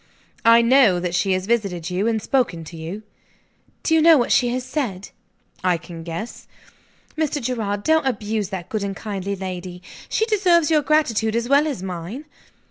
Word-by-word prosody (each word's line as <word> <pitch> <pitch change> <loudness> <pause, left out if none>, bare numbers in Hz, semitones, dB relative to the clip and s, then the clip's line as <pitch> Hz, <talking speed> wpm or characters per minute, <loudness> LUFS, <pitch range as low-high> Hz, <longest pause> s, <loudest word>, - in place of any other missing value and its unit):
"I 230 +1 +7
know 235 -7 +5
that 175 -1 -3
she 190 +1 +1
has 185 0 -1
visited 195 -7 -1
you, 190 +4 0
and 225 -1 +1
spoken 220 -9 0
to 165 +2 -11
you." 165 +7 -7 0.8
"Do 320 - +1
you 320 - +5
know 325 0 +7
what 240 - 0
she 245 - +4
has 250 +1 -2
said?" 245 -9 -3 0.5
"I 180 -2 +2
can 165 0 -10
guess." 170 +8 -7 0.7
"Mr. 310 -1 -1
Gerard, 220 -5 -2
don't 315 -3 +2
abuse 215 -4 -2
that 190 -3 -6
good 215 - -3
and 200 -1 -3
kind 200 -3 -5 0.2
lady. 180 -1 -6 0.3
She 440 - +1
deserves 360 -8 +3
your 305 -1 +4
gratitude 235 -7 +1
as 235 0 -1
well 285 +3 +4
as 265 -11 -4
mine." 185 - -6
220 Hz, 180 wpm, -22 LUFS, 185-270 Hz, 0.8 s, I